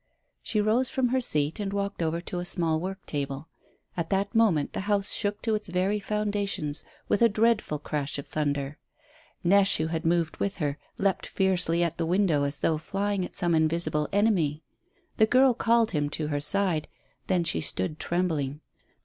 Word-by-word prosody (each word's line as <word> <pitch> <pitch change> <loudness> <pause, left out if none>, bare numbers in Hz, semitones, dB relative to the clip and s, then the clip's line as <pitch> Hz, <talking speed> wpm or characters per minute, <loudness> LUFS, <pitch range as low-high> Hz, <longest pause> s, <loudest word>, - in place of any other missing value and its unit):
She 215 - -1
rose 225 +5 +2
from 260 -4 0
her 260 +1 +1
seat 150 -8 0
and 200 -2 -2
walked 200 -2 -3
over 165 0 0
to 180 0 -5
a - - -3
small 170 -3 +2
work 190 +3 -6
table. 140 +1 -4 0.5
At 170 -2 -3
that 200 +1 0
moment 200 -11 +2
the - - -3
house 200 -1 +2
shook 205 +1 -1
to 225 - 0
its 210 -2 -2
very 185 +4 0
foundations 205 -7 -2 0.2
with 205 - +1
a 230 - +6
dreadful 215 -6 +1
crash 145 -1 -3
of 140 - -7
thunder. 145 -1 -2 0.6
Neche, 195 +2 +4
who 155 - -1
had 160 -1 -2
moved 165 -1 0
with 200 - -2
her, 145 -3 -2 0.2
leapt 195 -1 0
fiercely 175 -3 +2
at 170 -1 -2
the 165 - 0
window 175 -4 +2
as 140 +1 -4
though 160 -2 +1
flying 200 +3 -2
at - - -7
some 175 -1 +2
invisible 155 -1 +1
enemy. 180 -8 +1 0.5
The 220 - +5
girl 255 +2 +5
called 230 -1 +2
him 145 -2 0
to 150 0 -3
her 145 -1 -1
side, 180 -2 +2 0.4
then 180 -2 +2
she 85 - -1
stood 95 - +1
trembling. 155 -5 -1
175 Hz, 185 wpm, -27 LUFS, 155-205 Hz, 0.6 s, a